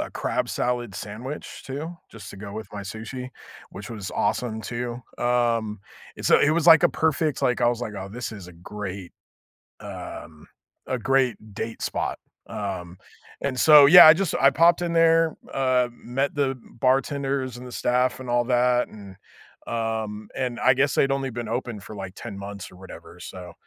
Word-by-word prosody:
a - - -4
crab - - -2
salad 120 -3 -2
sandwich 110 +9 -7
too, 155 +6 -6
just 105 -4 -11
to - - -11
go 100 0 -8
with 110 +1 -6
my 105 - -6
sushi, 110 +5 -7 0.4
which 105 +4 -9
was 105 -4 -6
awesome 110 -3 -1
too, 120 +2 -5 0.2
um, 115 -4 0 0.4
and, - - -4
so, - - +6
it 145 - +4
was, 165 +1 +1
like, 165 -2 +8
a - - +6
perfect 155 -2 0
like, 125 - +1
I - - +4
was 120 0 -1
like, 115 -3 -4
"Oh, 95 0 -6
this 115 +2 -6
is 100 -4 -10
a 90 - -12
great, 95 +1 -7 0.7
um, 80 -3 -9 0.4
a 130 - -1
great 130 -2 +2 0.2
date 115 +3 -5
spot." - - -2 0.3
Um, 95 -3 -5 0.4
and 135 -2 -2
so 150 -2 +9
yeah, 175 +1 +11
I 155 - +10
just 185 0 -1
I 135 - +6
popped 170 +3 +4
in 170 -1 -1
there, 165 -1 +4 0.2
uh, 130 -2 +2
met 135 +4 -3
the 135 -2 0 0.2
bartenders, 135 0 0
and 125 - -10
the 125 - -10
staff, 125 +2 0
and 130 - -8
all 120 0 +2
that, 125 0 +2
and, 100 -3 -12 0.5
um, 110 -2 -3
and 125 -2 -2
I 130 - +5
guess 140 +1 +1
they'd 135 - +3
only 135 -1 -1
been 120 -1 -5
open 120 -2 -3
for, 105 +2 -10
like, 95 -2 -7
10 100 - -8
months, 100 -1 -8
or 90 - -15
whatever 95 0 -12
so, 90 -2 -9
120 Hz, 185 wpm, -24 LUFS, 105-135 Hz, 0.7 s, yeah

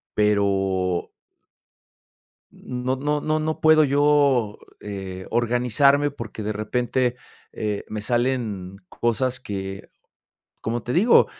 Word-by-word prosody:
pero 95 -3 +1 1.4
no, 125 +1 -3
no, 145 +2 -1
no, 155 +1 0
no 155 0 -2
puedo 155 0 +6
yo, 140 -6 +3 0.2
eh, 95 -2 -6
organizarme 125 +5 +3
porque 115 -5 -7
de 105 +1 -2
repente, 125 +3 0 0.4
eh, 105 -1 -3
me 110 -1 -4
salen 115 -6 -1
cosas 125 +2 -1
que 95 -4 -6 0.7
como 115 +1 -2
te 120 - -4
digo, 205 - +5
120 Hz, 105 wpm, -23 LUFS, 105-135 Hz, 1.4 s, puedo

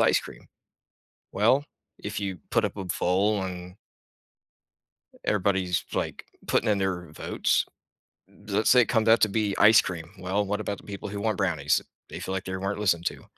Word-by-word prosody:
"ice - - +5
cream". - - -12 0.8
Well, 120 +8 +3 0.3
if - - -5
you 95 -2 -3
put 115 -1 +3
up 105 - -5
a 95 - -4
poll 95 +4 +1
and 90 -1 -7 1.5
everybody's, 95 -3 +1
like, - - -3 0.2
putting 115 - +1
in 105 -2 +3
their 90 -4 -2
votes. - - 0 0.6
Let's 105 +1 -1
say 125 - +7
it 120 - +2
comes 110 -1 +2
out 115 - +6
to 110 - +6
be 105 -1 0
ice 110 +1 +8
cream. 85 -3 -6
Well, 95 +3 -1
what 105 +2 -2
about 100 -1 -3
the - - -15
people 100 0 -6
who 100 0 -5
want 110 -2 -1
brownies? - - +1 0.3
They - - -7
feel 95 - -4
like 95 +1 -3
they 95 0 -4
weren't 95 +2 -3
listened 85 -5 +1
to. - - -3
100 Hz, 180 wpm, -26 LUFS, 95-105 Hz, 1.5 s, ice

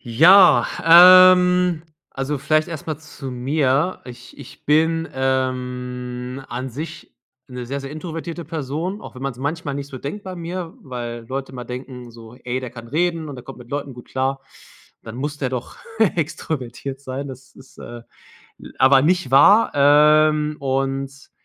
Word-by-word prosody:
Ja, 175 - +6 0.7
ähm, 180 -2 +1 0.3
also, 140 +2 -3
vielleicht 155 +4 +1
erstmal 155 -2 -6
zu 150 -3 -9
mir. 135 +6 0
Ich 125 -1 -12
ich - - -13
bin, 160 +2 +1
ähm, 125 -1 -3
an 125 +2 -5
sich 155 +6 -8 0.4
'ne 125 -1 -7
sehr, 140 +3 -4
sehr 135 - -8
introvertierte 165 +2 -6
Person, 160 +6 -4
auch - - -11
wenn 130 - -10
man's 135 -3 -4
manchmal 145 +1 -3
nicht 140 0 -6
so 135 -2 -8
denkt 150 +11 -7
bei 185 -1 -7
mir, 170 0 -6
weil 120 -2 -7
Leute 135 0 -5
mal 125 -1 -7
denken, 125 0 -8
so: 115 0 -14
„Ey, 125 +1 -2
der 125 -2 -7
kann 115 -1 -11
reden 165 +2 -1
und 140 - -8
der 125 - -11
kommt 135 - -11
mit 120 -1 -14
Leuten 140 -2 -4
gut 125 - -13
klar, 135 +1 -2 0.6
dann 110 +1 -9
muss 145 +3 -4
der 130 -3 -2
doch 125 -2 -6 0.4
extrovertiert 140 -4 -4
sein.“ 140 +1 -6
Das 130 0 -12
ist, 135 0 -18
äh, 120 0 -10 0.6
l - - -12
aber 130 0 +5
nicht 175 -3 +1
wahr, 200 +12 +6
ähm, 150 +1 +4
und 135 0 -3
135 Hz, 160 wpm, -21 LUFS, 125-155 Hz, 0.7 s, Ja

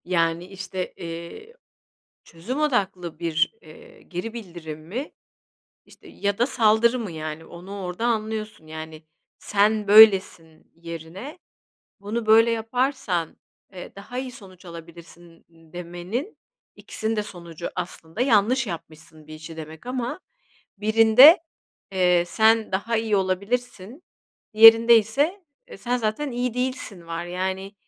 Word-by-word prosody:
Yani, 170 -1 0
işte, 185 -1 -6
iii, 170 - -9 0.7
çözüm 200 - -6
odaklı 190 - -1
bir, 170 - 0
eee, 475 -1 -16
geri 185 +6 -6
bildirim 170 -8 -8
mi, 250 - -5 0.8
işte, - - -17
ya 200 0 -3
da 240 - +3
saldırı 235 0 +3
mı, 220 -6 -5
yani 155 0 -6
onu 190 +4 -9
orada 180 +5 -5
anlıyorsun. 220 -5 -3
Yani, 160 0 -9 0.4
"Sen 210 +1 +1
böylesin." 195 -7 +5
yerine 170 - -9 0.6
"Bunu 215 +3 -4
böyle 225 +2 +6
yaparsan, 225 - -2 0.4
eee, 180 - -9
daha 210 +5 -8
iyi 260 -1 -5
sonuç 190 -5 -15
alabilirsin." 170 0 -13
demenin, 175 - -7 0.4
ikisinin 220 +1 -3
de 210 - 0
sonucu 170 -4 -8
aslında 170 -2 -7
"Bir - - -3
işi 265 - 0
yanlış 235 +5 +3
yapmışsın." 160 -3 -10
demek 155 +2 -10
ama 250 +5 -4 0.6
birinde, 225 - +7 0.5
eee, 180 -2 +3
"Sen 220 +3 +2
daha 215 +5 -1
iyi 220 -2 0
olabilirsin.", 200 - -3 0.5
diğerinde 225 +1 +8
ise 285 - -1 0.2
"E, - - -11
sen 240 +5 -2
zaten 240 +5 -2
iyi 245 -1 -2
değilsin." 250 -8 -4
var. 165 +1 -5
Yani, 190 +2 -4
200 Hz, 125 wpm, -24 LUFS, 170-230 Hz, 0.8 s, diğerinde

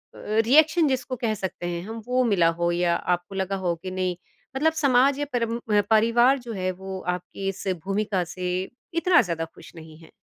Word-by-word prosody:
अ, - - -12 0.3
reaction 315 +5 +5
जिसको 260 -1 -1
कह 230 -2 -1
सकते 190 -3 -5
हैं 170 -1 -3
हम 225 0 -6
वो 255 +1 +2
मिला 195 -7 +3
हो 170 0 +2
या 175 0 +1
आपको 180 +2 -2
लगा 190 0 -1
हो 180 -3 -1
कि 185 - -5
नहीं, 185 -1 -1 0.4
मतलब 315 +4 +2
समाज 270 +1 +4
या 290 - -1
परम 230 -1 0 0.2
अ, 205 - +6
परिवार 235 +4 +4
जो 240 -2 -7
है 185 -1 -1
वो 190 +1 -7 0.2
आपकी 180 +2 -7
इस 195 +1 -6 0.2
भूमिका 195 -1 0
से 185 -1 -5 0.5
इतना 345 +1 +4
ज़्यादा 165 -3 -3
खुश - - -14
नहीं 160 -1 -12
है? 165 0 -17
200 Hz, 200 wpm, -25 LUFS, 180-250 Hz, 0.5 s, अ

